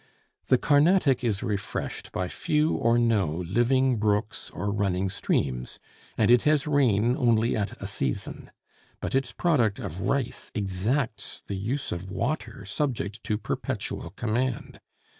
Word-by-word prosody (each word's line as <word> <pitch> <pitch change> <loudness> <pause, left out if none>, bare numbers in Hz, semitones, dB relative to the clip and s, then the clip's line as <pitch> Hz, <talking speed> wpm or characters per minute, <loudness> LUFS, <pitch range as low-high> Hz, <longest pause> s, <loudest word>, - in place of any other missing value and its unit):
The - - +5
Carnatic 145 -2 +4
is 105 -4 0
refreshed 100 -2 -3
by 90 - -2
few 150 - +1
or 115 +1 +2
no 115 -6 +3 0.2
living 125 +5 +3
brooks 105 0 0
or 100 - -3
running 95 -2 0
streams, 60 -7 -1 0.4
and 110 +1 +4
it 120 -1 +7
has 150 -1 +3
rain 125 -6 +3
only 115 -2 +2
at 105 -2 -3
a - - -6
season; 80 -10 -3 0.5
but - - -4
its 135 -2 +1
product 125 - +2
of 90 +5 -6
rice 135 -3 -1
exacts 105 +5 -1
the 100 - -4
use 125 +8 -3
of 90 +2 -4
water 110 +2 -3
subject 110 -2 -2
to 105 - 0
perpetual - - -4
command. 120 +2 -2
115 Hz, 140 wpm, -27 LUFS, 100-130 Hz, 0.5 s, it